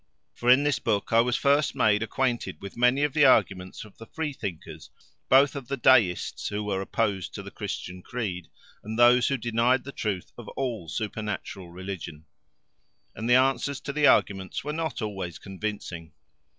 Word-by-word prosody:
For 120 - -1
in 130 +3 +7
this 145 -2 +1
book 105 -1 -1
I 115 - +7
was 120 0 0
first 145 +1 +2
made 105 -1 +3
acquainted 120 +1 -2
with 100 - -9
many 125 +4 +3
of 145 -2 0
the 150 - +4
arguments 95 -8 +2
of 105 - -18
the 115 - -10
freethinkers, 95 - -6 0.4
both 140 +2 +5
of 135 -4 -6
the 140 - -3
Deists 115 -8 +3
who 105 +1 -3
were 100 -2 -2
opposed 100 -2 -2
to - - -6
the - - -9
Christian 90 0 -6
creed, 95 -7 -4 0.4
and 110 - -6
of - - -4
those 120 +1 +6
who 135 - 0
denied 120 +2 +1
the 140 - -8
truth 100 -8 -4
of 115 - -10
all 115 -11 -3
supernatural 105 -3 -5
religion. 90 -4 -7 0.9
And 115 +2 -4
the 125 - +6
answers 135 +1 +2
to 140 - -5
the 150 0 +4
arguments 95 -2 +2
were 150 +2 -3
not 160 -6 -3
always 95 -5 -5
convincing. 95 -5 -6
115 Hz, 175 wpm, -26 LUFS, 95-130 Hz, 0.9 s, in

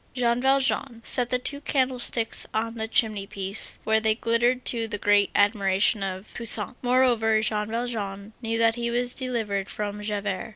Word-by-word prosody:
Jean 240 -1 +1
Valjean 270 -2 +1
set 245 -2 +1
the 250 - +2
two 280 +3 -3
candlesticks 255 -5 0
on 225 +1 -1
the 220 -1 -4
chimney 215 -3 +1
piece, 195 0 -2
where 220 0 +3
they 220 0 +1
glittered 240 +2 +1
to 230 -2 0
the 210 - -4
great 205 0 +3
admiration 205 0 +2
of 190 +1 -5
Toussaint. 230 -2 -1
Moreover, 245 -3 +3
Jean 210 -1 -1
Valjean 220 -3 -4
knew 225 -1 -1
that 225 0 +3
he 235 0 -2
was 245 +1 +2
delivered 220 -7 -2
from 210 0 -4
Javert. 205 0 -3
225 Hz, 165 wpm, -25 LUFS, 205-245 Hz, -, where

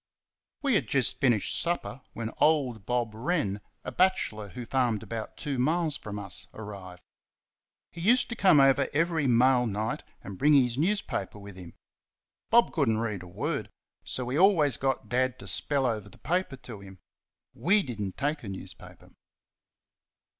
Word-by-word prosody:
We 275 -2 +2
had 210 - +2
just 135 -3 +1
finished 120 -7 +2
supper 170 -5 -2
when 115 -1 -4
old 130 -9 +2
Bob 120 -3 0
Wren, 110 - -1 0.2
a - - -5
bachelor 110 - +1
who 125 +3 -7
farmed 120 -4 0
about 110 0 -6
two 140 -4 -3
miles 155 +3 +1
from 105 -1 -7
us, 100 -2 -4
arrived. 95 -5 -9 0.9
He 170 - -9
used 240 +7 +4
to 240 - -4
come 185 -9 +5
over 135 -1 +4
every 160 -1 +1
mail 125 +1 +4
night 110 +1 -2 0.2
and 95 -1 -8
bring 150 +1 +5
his 125 -4 +3
newspaper 165 - -1
with 100 -1 -10
him. 90 -2 -11 0.7
Bob 235 +1 +4
could 140 -7 +2
n't 110 - +2
read 110 -4 -2
a 90 - -10
word, 85 - -3 0.3
so 125 -1 -3
he 135 +5 0
always 165 - +5
got 135 -5 -1
Dad 130 +2 0
to - - -10
spell 140 -2 0
over 110 -4 -2
the - - -16
paper 180 -4 -1
to 120 -4 -9
him. 95 -1 -12 0.6
WE 200 +3 +2
did 120 -5 -6
n't 95 -2 -4
take 145 +2 -1
a 105 - -6
newspaper. 95 - -10
125 Hz, 170 wpm, -28 LUFS, 105-155 Hz, 0.9 s, come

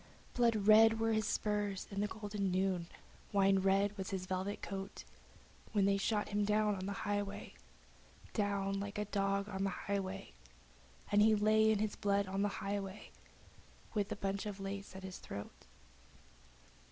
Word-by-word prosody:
Blood 235 -2 +3
red 225 +1 +7
were 225 0 +2
his 215 -1 +1
spurs 205 -2 -1
in 200 0 -2
the 210 - +1
golden 205 -2 -3
noon, 185 -2 0 0.4
wine 195 -1 +4
red 195 +2 +2
was 190 - -3
his 190 -2 -3
velvet 190 +2 -2
coat 195 0 -5 0.7
When 205 -2 +3
they 200 0 +3
shot 210 +1 0
him 205 0 +1
down 210 -1 +2
in 185 - -4
the - - -2
highway, 205 -1 -2 0.8
Down 200 -2 0
like 200 0 -5
a 210 - -1
dog 200 0 0
in 195 -2 -3
the 195 - +1
highway, 195 - -3 0.8
And 205 0 +5
he 215 +1 +6
lay 215 +1 +4
in 220 - +4
his 210 0 -1
blood 200 0 +1
in 195 +1 -2
the 205 - +3
highway, 200 0 -4 0.8
with 205 -3 0
the 215 - -2
bunch 200 +1 -2
of 205 -1 -5
lace 195 0 -5
at 190 - -8
his 190 -1 -7
throat. 100 0 -8
200 Hz, 165 wpm, -35 LUFS, 195-210 Hz, 0.8 s, red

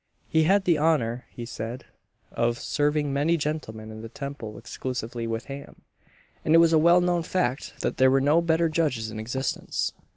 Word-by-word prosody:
He 160 0 +3
had 195 +3 +4
the 170 -4 +3
honour, 125 -7 +1
he 120 - -8
said, 115 +1 -6 0.5
of 120 0 0
serving 145 0 0
many 155 +5 +2
gentlemen 125 -8 -4
in 110 0 -8
the 115 - -8
Temple 125 -5 -7
exclusively 115 -1 -5
with 115 0 -3
ham; 140 0 -9 0.6
and 155 - +4
it - - +9
was 165 0 +5
a 160 - +6
well 170 +3 +6
known 175 -1 +1
fact, 155 -6 -2
that - - -1
there 130 0 +6
were 135 +1 +4
no 145 +5 +4
better 165 0 +2
judges 145 -9 -1
in 110 - -6
existence. 130 +5 -2
140 Hz, 185 wpm, -26 LUFS, 115-160 Hz, 0.6 s, it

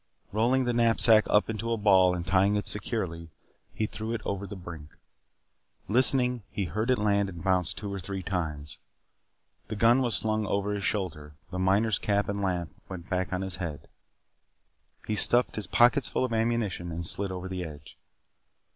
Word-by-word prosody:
Rolling 120 +5 +2
the 120 - 0
knapsack 115 -1 +4
up 105 - +3
into 115 +1 -3
a 115 - 0
ball 95 -4 +4
and 85 -1 -5
tying 95 +2 +2
it 105 - -1
securely, 90 -6 -4 0.4
he 110 - -2
threw 110 +2 -5
it - - -5
over 100 0 -3
the 100 - -8
brink. 85 -5 -10 1.0
Listening, 125 +1 +4
he 100 - -3
heard 105 +8 -3
it 130 - +3
land 100 -1 +1
and 85 -4 -9
bounce 90 -3 +1
two 100 -2 -6
or 100 - -4
three 95 +1 -6
times. 80 -6 -4 0.9
The - - -5
gun 115 +4 +4
was 120 -3 +2
slung 110 -1 +2
over 100 +1 -1
his 100 -1 -4
shoulder. 75 -9 -3 0.2
The 90 - -4
miner's 100 +4 +2
cap 100 0 0
and 100 0 -2
lamp 90 -5 -2 0.2
went 90 -3 -9
back 90 0 0
upon 95 0 -3
his 95 -3 -3
head. 80 -6 -6 1.2
He 110 - -2
stuffed 120 +4 +3
his 105 -3 -3
pockets 120 +6 +3
full - - 0
of 120 - -4
ammunition 110 -6 -1
and 85 +1 -5
slid 100 +4 -2
over 90 0 -5
the 95 -1 -4
edge. 75 -3 -10
100 Hz, 180 wpm, -28 LUFS, 90-110 Hz, 1.2 s, knapsack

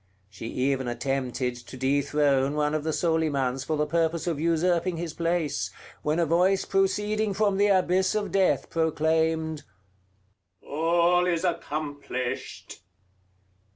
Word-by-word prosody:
She 100 +3 -8
even 130 +1 -1
attempted 125 0 -2
to 120 +2 -11
dethrone 140 +1 +1
one 150 0 +1
of 155 -1 -1
the 160 - -2
Solimans 145 -6 0
for 155 +2 -2
the 150 - +1
purpose 165 +1 0
of 165 -4 -1
usurping 170 +2 +1
his 165 -2 -4
place, 170 -2 -1 0.3
when 150 +2 0
a 170 - +2
voice 180 +4 +2
proceeding 210 +2 0
from 200 -2 +1
the 205 +1 +4
abyss 185 -1 +2
of 210 -1 -1
Death 195 -1 +1
proclaimed, 160 -1 0 1.0
"All 170 +3 +2
is 170 -1 0
accomplished!" 145 - -4
160 Hz, 125 wpm, -26 LUFS, 140-175 Hz, 1.0 s, the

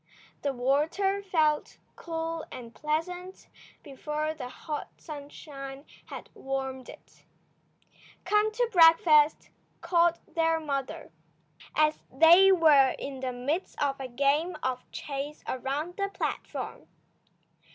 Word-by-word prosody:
The 285 - 0
water 300 +10 +1
felt 315 -6 0 0.2
cool 325 -1 -4
and 235 -2 -9
pleasant 355 +6 -4 0.4
before 300 +2 -3
the 260 -5 -7
hot 300 +3 -6
sunshine 280 -2 -9 0.2
had - - -8
warmed 265 -1 -4
it. - - -15 1.0
"Come 420 +1 +2
to 480 +2 0
breakfast," 325 -4 +5 0.3
called 340 0 +2 0.2
their 325 -1 +2
mother, 275 - -4 0.6
as 305 0 +2
they 340 +7 +7
were 300 -7 +5
in 275 -1 -6
the 260 -1 -3
midst 280 +9 -3
of 275 -1 0
a 265 - -4
game 280 +7 +1
of 255 -1 -3
chase 285 +1 -6
around 280 +7 -3
the 395 -1 -1
platform. - - -5
300 Hz, 110 wpm, -28 LUFS, 275-335 Hz, 1.0 s, they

